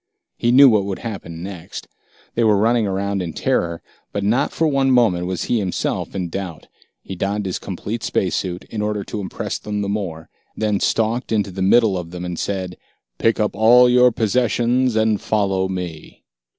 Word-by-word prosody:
He 120 - +1
knew 135 +3 +8
what 105 -5 +3
would 100 -1 -3
happen 85 -6 -6
next. 95 -4 -8 0.5
They 120 - +1
were 105 -2 +4
running 115 +1 +2
around 100 0 -1
in 85 -3 -4
terror, 85 +2 -1 0.3
but 100 - -3
not 120 +8 +1
for 165 - +1
one 135 -2 +2
moment 110 -9 +3
was 90 -2 -2
he 120 - 0
himself 95 -1 -2
in 90 -3 -2
doubt. 90 -2 -6 0.4
He 95 - -7
donned 100 +3 -2
his 95 - -3
complete 105 +4 -5
space 95 -4 0
suit, 90 -1 -3
in 110 - -3
order 105 -1 -2
to 105 - -5
impress 95 - -4
them 105 -1 -3
the - - -2
more, 90 -6 -4 0.3
then 105 -2 0
stalked 115 +2 0
into 105 -3 0
the 95 +1 -6
middle 100 0 +4
of 85 -1 -7
them, 90 0 -6
and 90 -1 -4
said, 95 -2 -3 0.4
"Pick 115 0 +2
up 105 -1 0
all 120 +3 +6
your 125 0 +5
possessions 120 +2 +1
and 110 -2 +2
follow 95 -3 0
me." 90 -4 -7
100 Hz, 190 wpm, -20 LUFS, 95-115 Hz, 0.5 s, knew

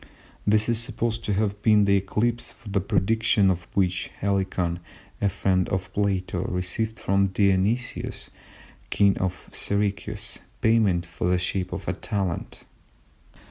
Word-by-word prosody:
This 105 +1 +4
is 115 -2 +4
supposed 115 -1 -1
to 105 - 0
have 100 0 -1
been 105 -1 +5
the 100 0 +4
eclipse 110 +5 -1
for 105 - -12
the 100 -1 +1
prediction 105 0 +2
of 85 -2 -4
which 90 -2 +1
Helicon, 95 -3 -1 0.4
a 100 - +3
friend 95 -1 +1
of 95 0 -3
Plato, 95 -3 0
received 90 +5 -2
from 100 0 +2
Dionysius, 100 +5 0 0.6
King 100 -1 +3
of 95 -1 -3
Syracuse, 100 0 -1 0.2
payment 105 -7 +3
in 90 - +1
the 90 - +3
shape 90 +1 -2
of - - -6
a - - +1
talent. 95 -5 -3
100 Hz, 140 wpm, -25 LUFS, 95-105 Hz, 0.6 s, been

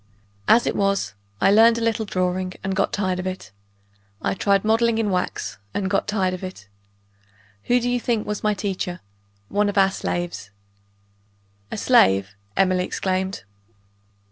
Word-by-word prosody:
As 235 - +5
it - - -1
was, 195 - 0 0.3
I - - +4
learned 225 +2 +6
a - - -3
little 225 -1 0
drawing 185 -1 -1
and 190 0 -2
got - - +1
tired 185 -3 -1
of 185 - -3
it. 185 0 -6 0.7
I - - -1
tried 200 +1 +1
modeling 225 +1 +3
in 215 -3 0
wax 180 - -2 0.2
and 190 -1 -1
got 195 - +1
tired 195 -3 0
of 185 - -6
it. 185 - -8 1.0
Who 245 +1 +3
do 245 - -2
you 245 0 +1
think 230 -3 -1
was 210 -1 -3
my 210 -1 +2
teacher? 185 -3 -3 0.5
One 205 0 +1
of 205 - -4
our 195 0 +5
slaves." 175 - -4 1.2
"A - - -5
slave!" 95 +1 +4 0.2
Emily 185 -1 +3
exclaimed. 190 - -2
195 Hz, 160 wpm, -23 LUFS, 185-215 Hz, 1.2 s, learned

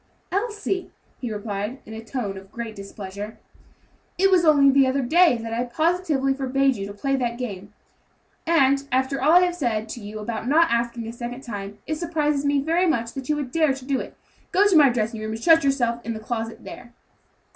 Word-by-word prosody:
"Elsie," 405 -2 -2 0.3
he 245 -3 -4
replied, 210 +3 -4
in 220 - -10
a 220 0 -7
tone 225 -4 -4
of 195 0 -12
great 230 -2 -6
displeasure, 200 +1 -8 0.8
"it 390 +1 +4
was 365 -2 +5
only 285 -4 +6
the 270 -1 +4
other 265 +1 0
day 325 +1 +4
that 225 0 -6
I 235 +1 0
positively 310 0 0
forbade 270 0 +1
you 195 -2 -5
to 200 - -8
play 275 +6 0
that 240 -2 -2
game, 205 -5 -6 0.8
and, 280 -4 +3
after 265 +2 0
all 310 - +4
that 360 +1 +7
I - - +5
have 355 -1 -2
said 225 -9 -1
to 240 - -6
you 210 +1 -7
about 220 +2 -4
not 325 +5 +4
asking 235 0 -1
a 230 - -6
second 240 +2 -6
time, 205 -3 -6
it 310 - -2
surprises 300 -4 -1
me 285 0 +2
very 335 +6 +1
much 235 -7 0
that 270 0 -7
you 300 - +2
would 285 -4 -4
dare 310 -3 +2
to 270 -1 -11
do 270 -1 0
it. - - -8 0.3
Go 395 +2 +4
to 395 - +3
my 295 -3 +7
dressing 225 -2 -2
room, 215 0 -4
and 220 - -5
shut 330 -2 +6
yourself 240 -4 0
into 230 -1 -4
the 215 - -12
closet 225 -1 -4
there." 240 -1 -11
255 Hz, 215 wpm, -24 LUFS, 225-300 Hz, 0.8 s, that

